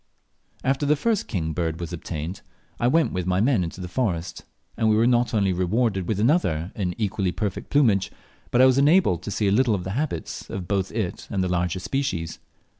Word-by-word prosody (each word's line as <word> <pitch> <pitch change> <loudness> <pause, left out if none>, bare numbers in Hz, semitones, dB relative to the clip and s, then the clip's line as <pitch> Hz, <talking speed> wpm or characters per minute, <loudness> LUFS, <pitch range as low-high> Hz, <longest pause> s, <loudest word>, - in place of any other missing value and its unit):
After 135 +2 +1
the 150 - +4
first 225 +7 0
king 80 -7 -2
bird 80 0 -2
was 85 0 -5
obtained, 85 +2 -5 0.4
I 120 - +2
went 155 -1 +3
with 90 -1 -2
my 90 0 +2
men 115 -3 +3
into 85 +2 -6
the 90 - -5
forest, 90 -5 -2 0.3
and 110 -2 +2
we 110 - +4
were 110 +2 +4
not 120 0 +3
only 100 -4 +2
rewarded 95 +1 0
with 105 -3 -1
another 105 - +1
in 90 -4 -2
equally 100 -3 0
perfect 105 0 -4
plumage, 115 -10 +3 0.4
but 125 - +3
I - - +9
was 130 0 +4
enabled 145 - +4
to 95 - -6
see 105 0 0
a - - +3
little 115 +1 +3
of 90 - -4
the 95 - -4
habits 130 - -3
of 90 -3 -5
both 95 -1 -1
it 105 -5 -3
and 95 -3 0
the - - 0
larger 90 0 0
species. 95 - -2
100 Hz, 210 wpm, -24 LUFS, 90-125 Hz, 0.4 s, I